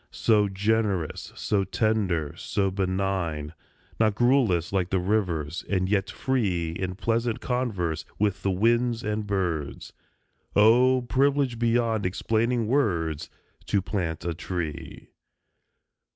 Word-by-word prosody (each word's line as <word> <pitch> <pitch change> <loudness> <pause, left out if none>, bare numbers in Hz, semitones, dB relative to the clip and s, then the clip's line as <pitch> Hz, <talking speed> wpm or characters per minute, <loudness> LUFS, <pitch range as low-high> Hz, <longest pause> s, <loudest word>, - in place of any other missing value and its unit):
So 105 -3 +2
generous, 100 -3 -1
so 100 -2 0
tender, 95 -6 0
so 95 -1 -1
benign. 95 -5 -2 0.5
Not 110 -2 +3
garrulous 115 - +2
like 95 -2 +1
the 95 - +1
rivers; 90 -5 -1
and 95 -2 +1
yet 100 0 +1
free 95 -11 -1
In 90 +2 -4
pleasant 115 +3 0
converse 100 -12 -2
with 100 -2 0
the 100 - 0
winds 115 +4 +2
and 105 0 -2
birds; 85 -8 -2 0.6
Oh! 125 +4 +5
privilege 135 0 +1
beyond 115 -3 +1
explaining 115 +5 0
words, 90 - 0 0.4
To 100 - +2
plant 85 -5 -3
a 85 - -1
tree. 80 -2 -6
100 Hz, 115 wpm, -26 LUFS, 90-115 Hz, 0.6 s, Oh